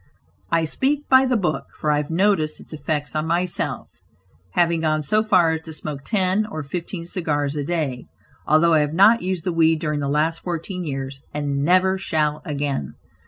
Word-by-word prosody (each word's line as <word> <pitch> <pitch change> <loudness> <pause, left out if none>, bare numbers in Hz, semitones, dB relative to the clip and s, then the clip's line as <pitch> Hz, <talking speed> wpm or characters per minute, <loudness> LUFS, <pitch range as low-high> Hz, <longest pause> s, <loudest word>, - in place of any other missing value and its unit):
I 165 -1 +2
speak 280 - -1
"by 260 0 +6
the 250 -2 +2
book," 175 -7 -1
for 150 - +1
I 150 - +2
have 145 0 -2
noticed 165 -3 +1
its - - -10
effects 150 0 -3
on 155 +1 -1
myself, 175 +2 -1 0.7
having 170 -1 +2
gone 155 -1 +1
so 215 +9 +2
far 185 -6 +4
as 160 0 -2
to 160 - -7
smoke 150 -2 -5
ten 195 +1 +1
or 155 -7 -5
fifteen 170 +3 -5
cigars 150 -5 -1
a 145 - -2
day; 145 -6 -2 0.4
although 160 +3 +4
I 155 - +5
have 150 +1 -1
not 210 +6 +6
used 185 -2 -2
the 180 - -1
weed 160 -1 +3
during 150 -2 -2
the 140 -1 -2
last 155 +3 +1
fourteen 180 +1 -4
years, 135 -2 -5
and 140 -1 -1
never 185 +3 +3
shall 150 -4 0
again. 140 - -3
160 Hz, 190 wpm, -22 LUFS, 150-180 Hz, 0.7 s, by